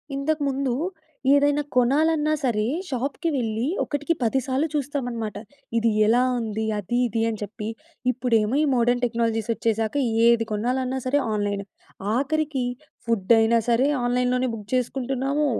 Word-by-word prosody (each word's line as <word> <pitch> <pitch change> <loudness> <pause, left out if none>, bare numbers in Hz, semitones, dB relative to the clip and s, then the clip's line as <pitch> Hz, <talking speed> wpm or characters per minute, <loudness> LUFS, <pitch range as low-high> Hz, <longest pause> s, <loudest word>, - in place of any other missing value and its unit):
ఇంతకుముందు, 275 -3 0 0.6
ఏదైనా 290 +1 +3
కొనాలన్నా 300 +5 +3
సరే! 220 -5 +1 0.2
షాప్‌కి 275 +5 -2
వెళ్ళి 225 -1 -1 0.2
ఒకటికి 290 +3 -1
పది 240 +4 +2
సార్లు 270 +4 +1
చూస్తామన్నమాట. 245 -7 -3 0.4
ఇది 230 0 +2 0.2
ఎలా 240 +3 +4 0.2
ఉంది? 220 -1 -2
అది, 240 +5 -1
ఇది 225 0 -2
అని 220 - -4
చెప్పి. 210 +1 -6 0.4
ఇప్పుడేమో 235 -2 +1
ఈ - - +3
మోడర్న్ 245 +1 +2
టెక్నాలజీస్ 230 -2 -1
వచ్చేసాక 225 +1 -1 0.3
ఏది 235 -1 +4
కొనాలన్నా 255 +4 -1
సరే! 285 +3 +3
ఆన్‌లైనే. 205 -1 -1 0.5
ఆఖరికి 290 -1 0 0.4
ఫుడ్ 225 -3 0
అయినా 225 +1 +4
సరే! 240 +3 +3 0.2
ఆన్‌లైన్‌లోనే 250 +1 +1
బుక్ 215 -2 -7
చేసుకుంటున్నాము. 270 +3 0
245 Hz, 125 wpm, -24 LUFS, 225-275 Hz, 0.6 s, ఎలా